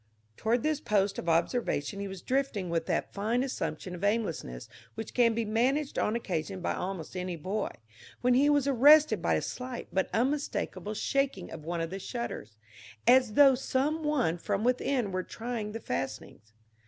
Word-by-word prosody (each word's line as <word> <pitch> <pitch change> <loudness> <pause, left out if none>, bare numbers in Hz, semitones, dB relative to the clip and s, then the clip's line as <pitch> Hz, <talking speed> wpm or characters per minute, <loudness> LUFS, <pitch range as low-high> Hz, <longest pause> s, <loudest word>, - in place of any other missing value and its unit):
Toward 230 - 0
this 305 -1 0
post 200 -4 +1
of 170 - -3
observation 165 - 0
he 200 - -3
was 190 -2 -8
drifting 255 -9 -1
with 165 -1 -1
that - - -1
fine 225 +5 0
assumption 250 -8 -4
of 180 +2 -8
aimlessness 200 - -1 0.3
which 225 - -6
can 235 -2 +4
be 230 0 0
managed 260 +7 +1
on 215 - +1
occasion 190 -4 -3
by 180 - -1
almost 185 -2 -5
any 180 -1 -3
boy, 195 +6 -2 0.5
when 250 0 +3
he 275 +4 +4
was 290 -2 +3
arrested 290 +4 +6
by - - +2
a - - -1
slight 250 -1 -6
but 190 - +1
unmistakable 250 -4 -1
shaking 275 -4 -1
of 155 -2 -9
one 170 0 -2
of 165 0 -3
the 195 - -4
shutters, 215 - -5 0.5
as 250 -3 +5
though 275 +2 +7
some 270 +4 0
one 265 - +1
from 195 - -1
within 250 -2 +1
were 185 0 -1
trying 225 +1 -5
the 225 - -5
fastenings. 125 - -5
225 Hz, 175 wpm, -30 LUFS, 185-260 Hz, 0.5 s, though